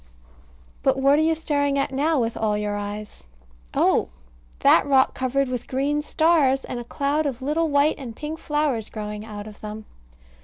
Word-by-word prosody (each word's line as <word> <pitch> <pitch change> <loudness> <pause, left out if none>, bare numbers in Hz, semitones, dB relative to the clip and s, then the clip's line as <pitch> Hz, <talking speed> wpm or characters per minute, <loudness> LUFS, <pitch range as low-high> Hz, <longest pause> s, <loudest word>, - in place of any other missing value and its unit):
But - - +2
what 275 +2 +4
are - - +3
you 320 +1 +2
staring 285 -3 0
at 275 0 0
now, 295 +3 +1
with 230 -1 -1
all 210 -1 0
your 210 0 -2
eyes? 205 - -7 0.5
Oh! - - +3 0.5
that - - +6
rock 270 -2 +4
covered 265 +1 0
with 250 -2 -4
green 285 +3 0
stars 295 -4 +2
and 245 - -5
a - - -5
cloud 285 +5 -1
of 260 -2 -5
little 315 +4 +1
white 285 +2 +2
and 240 -5 -7
pink 310 +4 -6
flowers 295 -9 -1
growing 210 -1 -6
out 210 -2 -8
of 215 -1 -12
them. 215 0 -7
270 Hz, 180 wpm, -24 LUFS, 220-295 Hz, 0.5 s, that